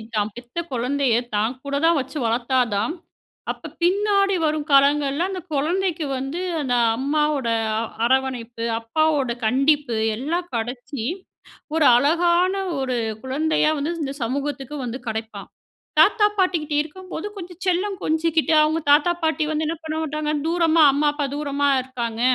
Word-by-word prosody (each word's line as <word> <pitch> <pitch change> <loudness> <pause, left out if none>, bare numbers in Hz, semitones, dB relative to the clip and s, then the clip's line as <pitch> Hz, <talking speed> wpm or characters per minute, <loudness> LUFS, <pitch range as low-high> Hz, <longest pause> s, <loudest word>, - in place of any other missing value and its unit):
தான் 210 0 0
பெத்த 240 +4 -12
குழந்தைய 255 0 +1 0.2
தான் 220 +4 +1
கூட 280 0 -3
தான் 335 -1 +4
வச்சு 265 +3 -5
வளத்தா 235 +3 +1 0.2
தான், 215 +9 0 0.6
அப்போ - - -8 0.2
பின்னாடி 395 +1 +2
வரும் 305 -1 -1
காலங்கள்ல 280 +3 +3
அந்த 375 -2 -5
கொழந்தைக்கு 335 +3 0
வந்து 270 +7 -4 0.2
அந்த 255 -3 0 0.2
அம்மாவோட 290 0 0 0.3
அ - - 0 0.3
அரவணைப்பு, 245 -2 -1 0.2
அப்பாவோட 280 +2 +1
கண்டிப்பு 275 +2 +2 0.2
எல்லாம் 335 +9 -3
கடச்சு 245 +2 -4 0.7
ஒரு 320 -2 +3
அழகான 345 +7 +3 0.2
ஒரு 260 -2 -1 0.3
குழந்தையா 305 +4 +1
வந்து 295 +4 -2
இந்த 270 - -3
சமூகத்துக்கு 275 +3 -3
வந்து 245 +1 -4
கிடைப்பான். 220 0 -5 0.5
தாத்தா 415 +6 +5
பாட்டிகிட்ட 335 -5 +1
இருக்கும்போது 370 +3 -7
கொஞ்சம் 355 -1 -9
செல்லம் 375 +2 0
கொஞ்சிக்கிட்டு, 320 0 +1
அவுங்க 310 +1 +1
தாத்தா 295 +4 +5
பாட்டி 315 -1 +1
வந்து 310 0 -1
என்ன 330 - -2
பண்ண 315 -1 -4
மாட்டாங்க, 305 0 -2 0.2
"தூரமா 330 -1 +3
அம்மா, 290 +2 +1
அப்பா 290 -1 -2
தூரமா 285 -1 -1
இருக்காங்க. 235 -3 -5
295 Hz, 135 wpm, -22 LUFS, 260-325 Hz, 0.7 s, தாத்தா